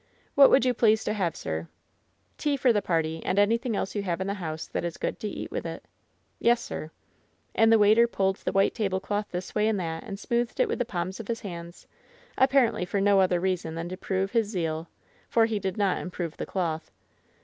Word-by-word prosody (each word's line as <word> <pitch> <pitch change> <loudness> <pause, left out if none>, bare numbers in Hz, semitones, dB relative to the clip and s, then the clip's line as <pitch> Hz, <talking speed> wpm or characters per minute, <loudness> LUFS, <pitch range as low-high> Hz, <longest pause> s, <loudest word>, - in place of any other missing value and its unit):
'^What 280 -1 +8
would 265 - +5
you 250 - +3
please 220 -2 +3
to 210 - -1
have, 185 -6 -1
sir 80 +1 -4 0.3
?" - - -42
"Tea 290 -1 +1
for 250 -2 +4
the 205 - +2
party, 160 -3 -1
and 185 - -1
anything 230 +3 +2
else 195 - -2
you 205 - -1
have 180 -3 -2
in 190 - -2
the 200 - -1
house 160 -5 -5
that - - -3
is 170 -1 -4
good - - -3
to 215 - -3
eat - - -6
with - - -3
iV^ - - -5 0.6
"Yes, 235 0 +4
sir/' 155 - -5 0.6
And 225 0 +4
the 225 - +7
waiter 215 +3 +5
pulled 195 -4 0
the - - -3
white 195 0 +3
tablecloth 205 0 -2
this 180 +1 -5
way 210 0 +2
and 220 -3 +1
that 165 -2 -4
and 200 -2 -6
smoothed 235 +3 -1
it - - +4
with 440 - -2
the 245 - +1
palms 185 -1 -4
of 225 - -7
his 230 -1 -3
hands, 170 -3 -8 0.5
apparently 255 -6 +3
for 190 +3 -1
no 200 0 +4
other 185 -2 +3
reason 180 -3 -1
than 165 +1 -4
to 185 - -4
prove 190 +1 -2
his 230 -3 +2
zeal, 165 -5 -3 0.4
for 230 -1 +4
he 220 -2 -1
did 190 0 -3
not 200 -3 +1
improve 175 -3 -5
the - - -4
cloth. 165 -4 -2
195 Hz, 225 wpm, -27 LUFS, 175-225 Hz, 0.6 s, ^What